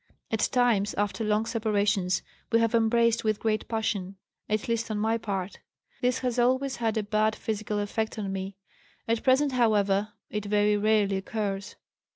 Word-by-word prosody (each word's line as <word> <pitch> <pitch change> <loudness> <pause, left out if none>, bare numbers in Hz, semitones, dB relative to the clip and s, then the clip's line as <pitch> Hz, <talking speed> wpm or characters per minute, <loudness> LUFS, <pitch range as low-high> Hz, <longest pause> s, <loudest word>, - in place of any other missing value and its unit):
At 220 -1 +1
times 235 -5 +2
after 205 +2 -1
long 215 +1 +1
separations 205 -5 0 0.3
we 230 - +5
have 230 0 +1
embraced 230 0 +3
with 215 -1 0
great 215 -1 -1
passion, 210 -4 -2 0.3
at 215 0 -1
least 230 0 -1
on 215 - -2
my 220 +2 +1
part. 195 -3 -4 0.4
This 250 0 +2
has 250 -1 0
always 260 +2 +2
had 225 -2 0
a 215 - 0
bad 215 +1 +1
physical 215 -1 -3
effect 220 +2 -2
on 200 -2 -3
me. 195 0 -4 0.5
At 230 0 +1
present, 270 +2 +3
however, 210 -4 +2 0.2
it 210 -1 -3
very 210 0 +3
rarely 205 -2 +2
occurs. 200 0 -3
215 Hz, 165 wpm, -27 LUFS, 205-230 Hz, 0.5 s, we